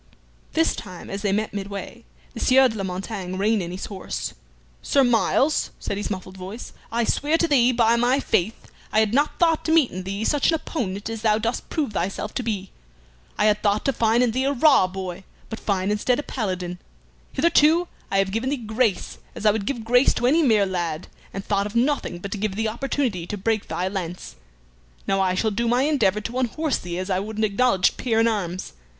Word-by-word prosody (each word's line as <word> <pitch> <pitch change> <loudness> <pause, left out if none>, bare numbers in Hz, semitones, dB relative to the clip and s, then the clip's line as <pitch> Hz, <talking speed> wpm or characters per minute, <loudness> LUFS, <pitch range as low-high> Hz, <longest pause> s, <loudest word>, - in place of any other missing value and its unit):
This 325 0 +2
time 185 -4 -9
as 195 +1 -4
they 205 -2 0
met 210 +1 -1
midway 200 - -6 0.3
the - - -7
Sieur 265 +1 +5
de 220 - -6
la 200 - -3
Montaigne 185 0 -4
reined 210 +2 +2
in 170 - -4
his 180 +2 -5
horse. 195 -3 -5 0.5
"Sir 275 - +3
Myles," 260 +4 +2
said - - -3
his 205 +1 -3
muffled 185 -1 -6
voice, 190 +6 -8 0.2
"I 235 +1 +1
swear 295 +7 +1
to 335 - +2
thee, 255 -5 +4
by 230 -1 +3
my 245 +3 +3
faith, 215 -4 -1 0.2
I 215 - +3
had 220 0 +2
not 290 +3 +1
thought 330 -2 +2
to 320 - 0
meet 320 -6 +4
in 185 - -5
thee 195 +3 -4
such 290 +2 +2
an 330 - +3
opponent 205 - -4
as 225 -1 -5
thou 215 -1 +3
dost 225 +2 -3
prove 290 -9 -2
thyself 195 +3 -3
to - - -2
be. 205 -5 -3 0.7
I 210 - +2
had 210 0 +3
thought 205 0 +1
to 275 - +2
find 230 +1 +3
in 245 - +2
thee 260 +3 0
a 280 - +1
raw 270 -7 +5
boy, 185 -1 -6 0.3
but 225 - -6
find 195 -1 0
instead 225 +4 +1
a 295 - -3
Paladin. 185 -8 -3 0.5
Hitherto 325 +3 +4 0.2
I 195 - 0
have 195 0 +2
given 225 +5 -1
thee 285 - 0
grace 220 -2 -1 0.2
as - - -7
I 210 - +7
would 205 -1 -3
give 240 -5 -2
grace 245 +3 +4
to 240 - -1
any 305 +7 +4
mere 220 -8 +4
lad, 175 -4 -3 0.2
and 195 0 -6
thought 200 0 0
of 210 - -10
nothing 250 -6 +1
but 195 +3 -7
to 210 - -3
give 205 -2 -2
thee 220 +1 0
opportunity 235 -6 -2
to 210 - -4
break 220 +1 -1
thy 180 - -2
lance. 180 -2 -5 0.7
Now 195 0 +1
I 185 -1 +1
shall 220 +3 +1
do 235 +3 -1
my 245 +3 +3
endeavor 265 -9 +2
to 240 +4 -4
unhorse 275 +4 0
thee 175 0 -5
as 185 +2 -3
I 185 - +2
would 215 +2 -6
an 220 - 0
acknowledged 205 -2 +2
peer 225 -3 0
in 225 - +4
arms. 185 -5 -3
215 Hz, 220 wpm, -23 LUFS, 195-250 Hz, 0.7 s, I